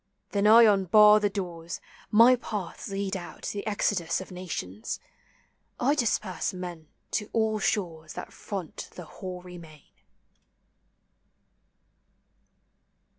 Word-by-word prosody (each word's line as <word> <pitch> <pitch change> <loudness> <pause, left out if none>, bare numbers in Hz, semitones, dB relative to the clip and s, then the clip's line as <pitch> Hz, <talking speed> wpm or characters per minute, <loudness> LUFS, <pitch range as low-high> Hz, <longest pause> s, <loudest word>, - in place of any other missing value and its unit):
rhen 200 0 +3
I 230 +2 +9
unbar 210 +1 +6
the 205 -1 +1
doors: 180 -2 -5 0.3
my 230 +4 +7
paths 210 -6 -5
lead 195 0 -2
out 175 -2 -8
rhe 205 - -3
exodus 200 -5 0
of 190 - -9
nations: 160 - -5 0.8
I 270 +4 +3
disperse 215 - -1
!klen 175 -3 -7 0.3
to 210 -1 -2
all 220 -1 +1
shores 165 -7 -2
that - - -8
front 190 -6 -6
the 175 - -8
hoary 180 -1 -8
main. 155 -3 -14
195 Hz, 110 wpm, -28 LUFS, 175-210 Hz, 0.8 s, I